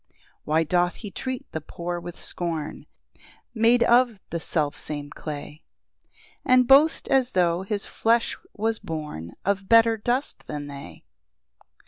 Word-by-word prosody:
2 - - -35 0.3
[Why 155 +2 +2
doth 175 +2 +1
he 205 -3 -8
treat 260 +3 -4
the 160 - -4
poor 175 +3 -5
with 175 0 -9
scorn, 165 -4 -4 0.7
Made 235 +1 +4
of 240 -3 +4
the 170 - -2
self 150 -3 -1
same 145 -1 -6
clay, 150 0 -7 0.8
And 255 -2 +4
boast 285 +4 +5
as 260 -2 +2
tho' 175 -1 +2
his 200 +1 -3
flesh 230 +1 +1 0.2
was 225 +1 -1
born 150 - -6
Of 195 0 -1
better 230 0 +6
dust 245 +6 -2
than 145 -1 -5
they? 140 -1 -10
185 Hz, 140 wpm, -25 LUFS, 155-235 Hz, 0.8 s, better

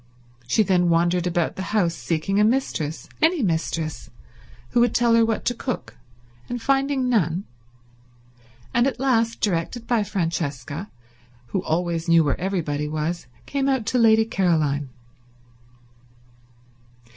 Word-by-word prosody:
She 215 - +3
then 180 -3 +2
wandered 175 +1 +2
about 175 -1 -1
the - - -3 0.2
house 170 -5 +2
seeking 170 +4 -1
a - - +5
mistress, 210 - -1
any 320 -2 +3
mistress, 160 -3 -2 0.6
who - - +1
would 240 -1 +3
tell 235 -1 +3
her 230 0 +5
what 225 -1 -1
to 245 - +1
cook, 245 +1 -5 0.5
and 245 - -3
finding 270 +1 +1
none; 185 -7 +1 1.3
and 240 +2 +3
at 270 - -3
last, 230 -4 +1
directed 205 +5 -1
by 235 -3 +1
Francesca, 165 - -3 0.6
who 190 - -1
always 170 0 -1
knew 165 -1 +6
where 145 0 -1
everybody 155 -6 -1
was, 155 +3 -3 0.2
came 275 -1 -1
out 265 -5 0
to 245 +3 +1
Lady 220 -1 +5
Caroline. 155 -9 0
190 Hz, 135 wpm, -23 LUFS, 165-235 Hz, 1.3 s, knew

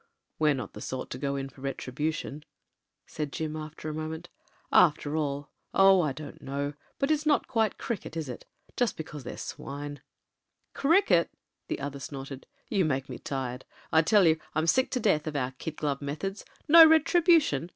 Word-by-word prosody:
"We're 155 -2 +4
not 130 -7 -6
the 105 - -9
sort 130 -1 -5
to 125 - -5
go 140 0 -1
in 135 0 -3
for 135 0 -16
retribution," 145 +2 -3 0.6
said 150 -2 -5
Jim, 155 0 -3
after 155 0 -7
a 155 - -3
moment. 160 +2 -5 0.4
"After 150 -2 +4
all 145 -2 -2
— - - -47
oh! 195 -1 +7
I 150 -4 0
don't 155 +3 -9
know 140 +1 -3
— - - -37
but 275 +2 +1
it's 305 0 +1
not 295 - +3
quite 220 -4 +1
cricket, 195 -7 -5
is 160 -3 -3
it? 125 - -7 0.3
Just 245 -3 0
because 150 -3 -7
they're 125 - -7
swine 145 +1 -6
•.. - - -26 0.4
?" - - -51
"Cricket 275 - +3 0.2
!" - - -55
the - - -3
other 140 0 -5
snorted. 135 0 -8 0.2
"You 195 -3 +1
make 135 -4 -1
me - - -6
tired. 130 -2 -4 0.3
I 160 - +6
tell 195 +4 +4
you 160 -1 +4 0.2
I'm 155 +1 +1
sick 255 +11 +3
to 255 - -1
death 160 -9 +2
of 155 - -4
our 130 -2 -1
kid 160 - -5
glove 145 -2 -2
methods. 175 +8 -4 0.2
No 325 +2 +10
retribution 320 - +4
155 Hz, 195 wpm, -28 LUFS, 140-195 Hz, 0.6 s, No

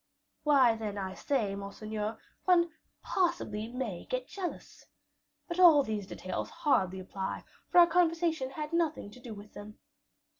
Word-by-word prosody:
"Why, 270 -6 +5
then, 215 -2 -4
I 190 -1 -3
say, 210 +2 -1
monseigneur, 210 +2 -4 0.3
one 345 -2 +4 0.3
possibly 340 - 0
may 235 -7 -4
get - - -2
jealous. 375 -3 -7 0.6
But 345 0 -4
all 325 -6 +8
these 215 -5 -3
details 185 - -4
hardly 195 - +1
apply; 190 +1 -5 0.3
for - - +2
our 350 - +10
conversation 330 -4 +1
had 300 +3 -6
nothing 320 -10 0
to 250 - -13
do 240 -3 -8
with 205 +1 -12
them." 210 +1 -10
250 Hz, 145 wpm, -31 LUFS, 205-335 Hz, 0.6 s, our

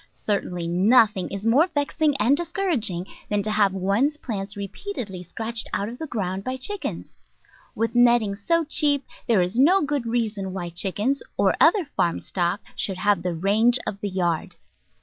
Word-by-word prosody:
Certainly 180 -4 -2
nothing 200 +2 +3
is 200 +1 -6
more 270 +10 +4
vexing 295 -2 0
and 245 +5 +3
discouraging 305 - -1 0.2
than 205 -1 0
to 215 - -2
have 210 -2 +3
one's 200 +11 0
plants 205 -7 -5
repeatedly 200 - -6
scratched 225 +6 -2
out 200 +2 -1
of 240 - -9
the 320 - -5
ground 195 -6 -3
by 255 +3 -3
chickens. 395 +10 -4 0.6
With 230 +1 -1
net 240 0 +5
ting 200 -2 -3
so 335 +12 +1
cheap 290 -3 +2 0.2
there 215 -6 +4
is 185 +7 -2
no 350 +9 +6
good 285 -4 -2
reason 215 -5 -2
why 175 -2 -4
chickens, 205 +10 0 0.2
or - - +3
other 400 -6 +5
farm 175 - -1
stock, 180 +3 -2
should 190 -2 -3
have 205 -1 +2
the 175 -1 -2
range 215 +8 +3
of 200 -2 -4
the 205 - -2
yard. 175 -4 -1
215 Hz, 170 wpm, -24 LUFS, 195-265 Hz, 0.6 s, no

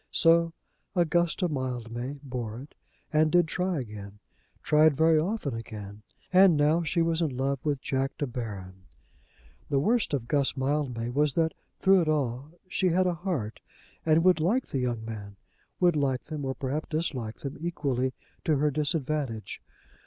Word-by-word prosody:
So 165 0 +4 0.4
Augusta 175 +1 +2
Mildmay 125 -2 -4
bore 120 -4 -5
it 140 +3 -12 0.4
and 155 0 +4
did 175 -2 +4
try 180 0 -1
again; 105 -3 -9 0.5
tried 155 -1 +5
very 160 0 +5
often 170 - -1
again. 105 -2 -7 0.3
And 185 -3 +7
now 150 +3 +3
she 165 +1 +1
was 165 0 +1
in 145 -6 -1
love 135 +1 0
with 145 -3 -1
Jack 135 0 -1
De 145 - -1
Baron. 100 -7 -7 0.8
The 140 - +1
worst 215 - +2
of 120 -4 -4
Guss 140 -1 +1
Mildmay 130 -4 -1
was 145 +2 +1
that, 160 -1 +2 0.2
through 190 -1 +5
it 160 - 0
all, 135 -2 -1 0.2
she 185 - 0
had 185 +2 +3
a 180 - +2
heart 165 - -3 0.4
and 160 +1 +4
would 185 -2 +5
like 215 +11 +2
the 135 - -1
young 120 -3 -2
men, 105 -3 -7 0.4
would 175 -2 +4
like 135 -3 0
them, 150 -3 -5
or 130 0 -2
perhaps 145 +3 -3
dislike 135 -9 -2
them, 140 -1 -5
equally 140 -6 -1 0.3
to 155 - +2
her 150 +2 +2
disadvantage. 145 -5 -2
145 Hz, 160 wpm, -28 LUFS, 125-165 Hz, 0.8 s, And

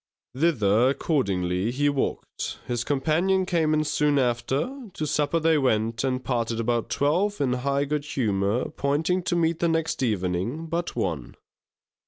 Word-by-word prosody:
Thither, 125 -6 +3
accordingly, 100 - 0
he 140 +4 0
walked; 140 -2 -2
his 120 -1 -2
companion 165 +7 +1
came 165 -4 +1
in 155 0 +2
soon 150 -1 +1
after; 135 - -1
to 155 - -3
supper 150 +2 +1
they 160 -1 +3
went 115 -3 +1
and 130 -1 -1
parted 115 -2 -1
about 115 0 0
twelve 180 +9 +1
in 130 -3 +1
high 140 +3 0
good 145 0 -2
humour, 105 -4 0
appointing 150 +6 0
to 175 - -1
meet 165 -1 +1
the 170 - +2
next 165 -3 0
evening 105 - -1
but 170 +1 -3
one. 85 - -3
140 Hz, 150 wpm, -25 LUFS, 115-160 Hz, -, Thither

